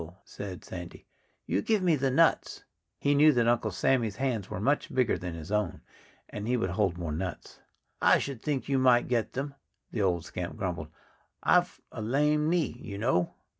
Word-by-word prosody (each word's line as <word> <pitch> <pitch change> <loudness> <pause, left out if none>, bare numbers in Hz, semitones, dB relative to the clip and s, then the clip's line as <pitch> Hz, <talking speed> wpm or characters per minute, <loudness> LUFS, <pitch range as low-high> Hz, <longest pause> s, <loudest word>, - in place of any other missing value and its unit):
said 95 -3 -8
Sandy. 85 -1 -8 0.4
"You - - 0
give 215 - +1
me 170 -3 +4
the 135 -1 0
nuts." 165 +5 +2 0.3
He 145 - +2
knew 150 +2 +6
that 120 -2 +2
Uncle 120 -2 +2
Sammy's 110 +2 +1
hands 120 -6 -2
were - - -4
much 140 +8 0
bigger 130 -2 +2
than 85 -1 -5
his 85 +3 -8
own 105 -4 -1 0.5
and 105 +1 -6
would 95 -5 -1
hold 95 -2 0
more 85 -3 -4
nuts. 85 +3 -5 0.4
"I - - +6
should 135 -5 -4
think 145 -3 -2
you 135 -1 +2
might 125 -2 +4
get 120 -3 0
them," 140 +2 -3 0.4
the 110 - -2
old 90 -4 +1
scamp 90 +4 -5
grumbled. 90 -6 -3 0.6
"I've - - +3
a - - -6
lame 150 +6 +2
knee, 165 -8 0
you 100 -3 -7
know." 100 -6 +1
115 Hz, 180 wpm, -29 LUFS, 95-135 Hz, 0.6 s, knew